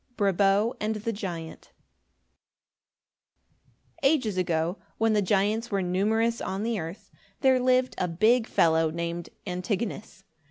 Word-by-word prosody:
BRABO 200 Hz, +3 st, +2 dB
AND 215 Hz, +1 st, -1 dB
THE 220 Hz, +2 st, -3 dB
GIANT 175 Hz, -6 st, -7 dB, 2.3 s
Ages 270 Hz, -8 st, +2 dB
ago, 170 Hz, 0 st, -1 dB, 0.2 s
when 225 Hz, 0 st, +2 dB
the 210 Hz, -, +3 dB
giants 205 Hz, +4 st, +1 dB
were 195 Hz, -2 st, 0 dB
numerous 220 Hz, +6 st, +1 dB
on 195 Hz, +2 st, -3 dB
the 230 Hz, -2 st, -1 dB
earth, 165 Hz, +5 st, -8 dB, 0.3 s
there 260 Hz, -2 st, +4 dB
lived 255 Hz, 0 st, +2 dB
a 180 Hz, -, +1 dB
big 220 Hz, +8 st, +3 dB
fellow 160 Hz, -1 st, +3 dB
named 170 Hz, +1 st, -4 dB, 0.2 s
Antigonus. 195 Hz, +2 st, -4 dB
205 Hz, 120 wpm, -27 LUFS, 180-225 Hz, 2.3 s, there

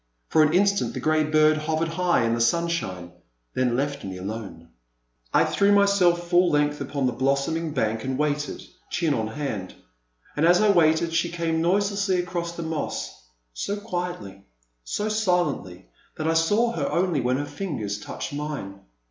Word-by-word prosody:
For 160 Hz, -, +4 dB
an 155 Hz, 0 st, +4 dB
instant 200 Hz, +2 st, +2 dB
the -, -, -3 dB
grey 155 Hz, 0 st, +2 dB
bird 155 Hz, 0 st, +4 dB
hovered 160 Hz, +2 st, -1 dB
high 175 Hz, -4 st, +1 dB
in 115 Hz, -, +1 dB
the 115 Hz, -, 0 dB
sun 170 Hz, +9 st, +2 dB
shine, 90 Hz, -, -4 dB, 0.4 s
then 125 Hz, -2 st, +1 dB
left 140 Hz, +1 st, -2 dB
me 95 Hz, -1 st, -6 dB
alone. 95 Hz, -3 st, -7 dB, 0.6 s
I -, -, +4 dB
threw 200 Hz, 0 st, +2 dB
myself 195 Hz, -4 st, +3 dB
full 175 Hz, 0 st, +4 dB
length 150 Hz, -1 st, +1 dB
upon 140 Hz, -2 st, -2 dB
the 125 Hz, -, +2 dB
blossoming 140 Hz, +6 st, 0 dB
bank 110 Hz, -4 st, -1 dB
and 130 Hz, 0 st, -2 dB
waited, 150 Hz, 0 st, -2 dB, 0.3 s
chin 165 Hz, -4 st, 0 dB
on 110 Hz, -4 st, -1 dB
hand. 110 Hz, -6 st, -5 dB, 0.6 s
And 150 Hz, -, 0 dB
as 175 Hz, +2 st, +5 dB
I 215 Hz, -1 st, +5 dB
waited, 165 Hz, -2 st, +3 dB
she 170 Hz, +1 st, +1 dB
came 165 Hz, -1 st, -1 dB
noiselessly 195 Hz, +2 st, +1 dB
across 175 Hz, -1 st, -3 dB
the 170 Hz, -, -5 dB
moss, 160 Hz, -, -4 dB, 0.3 s
so 200 Hz, -, -3 dB
quietly, 175 Hz, -, -5 dB, 0.4 s
so 205 Hz, -, -2 dB
silently 180 Hz, -, -1 dB, 0.3 s
that 155 Hz, -, -2 dB
I 165 Hz, -, +2 dB
saw 205 Hz, +9 st, +2 dB
her -, -, -2 dB
only 175 Hz, -5 st, +1 dB
when 125 Hz, +1 st, +1 dB
her 145 Hz, -, -2 dB
fingers 115 Hz, -, -4 dB
touched 105 Hz, -, -6 dB
mine. 145 Hz, -10 st, -5 dB
155 Hz, 170 wpm, -25 LUFS, 130-175 Hz, 0.6 s, as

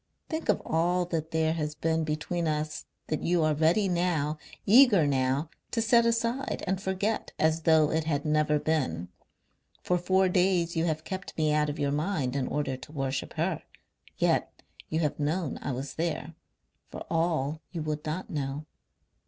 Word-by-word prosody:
Think 320 Hz, 0 st, -4 dB
of -, -, +2 dB
all 175 Hz, +2 st, +1 dB
that 160 Hz, -2 st, -3 dB
there 160 Hz, 0 st, +1 dB
has 150 Hz, -2 st, -3 dB
been 160 Hz, 0 st, 0 dB
between 155 Hz, +2 st, -2 dB
us 155 Hz, 0 st, -2 dB, 0.2 s
that 155 Hz, -, -2 dB
you 175 Hz, -1 st, +2 dB
are 155 Hz, 0 st, +3 dB
ready 165 Hz, +7 st, +3 dB
now, 170 Hz, -4 st, 0 dB, 0.3 s
eager 215 Hz, -, +7 dB
now 135 Hz, +3 st, 0 dB, 0.2 s
to 230 Hz, -, -1 dB
set 235 Hz, +1 st, +4 dB
aside 235 Hz, +3 st, -1 dB
and 190 Hz, 0 st, -1 dB
forget 195 Hz, +3 st, -1 dB
as 160 Hz, +1 st, +2 dB
though 155 Hz, -1 st, +4 dB
it 160 Hz, 0 st, 0 dB
had 145 Hz, -2 st, -1 dB
never 150 Hz, 0 st, +2 dB
been. 90 Hz, -, -1 dB, 0.7 s
For 180 Hz, 0 st, +1 dB
four 190 Hz, +2 st, +3 dB
days 180 Hz, -2 st, +2 dB
you 165 Hz, 0 st, +1 dB
have 155 Hz, -2 st, -1 dB
kept 190 Hz, +2 st, -6 dB
me 155 Hz, -1 st, +2 dB
out 150 Hz, 0 st, +2 dB
of 145 Hz, -, -4 dB
your 145 Hz, -1 st, 0 dB
mind 145 Hz, -4 st, -1 dB
in 135 Hz, -2 st, 0 dB
order 145 Hz, -3 st, -1 dB
to 130 Hz, +3 st, -12 dB
worship 135 Hz, -2 st, -3 dB
her. -, -, -1 dB, 0.6 s
Yet -, -, 0 dB, 0.3 s
you 160 Hz, +1 st, 0 dB
have 150 Hz, -2 st, -1 dB
known 155 Hz, +1 st, -1 dB
I -, -, -2 dB
was 135 Hz, +2 st, -4 dB
there 160 Hz, -1 st, -3 dB, 0.6 s
for -, -, -8 dB
all 160 Hz, -2 st, 0 dB
you 165 Hz, -3 st, -4 dB
would 150 Hz, -1 st, -3 dB
not 160 Hz, +5 st, -3 dB
know. 145 Hz, 0 st, -3 dB
160 Hz, 175 wpm, -28 LUFS, 150-180 Hz, 0.7 s, eager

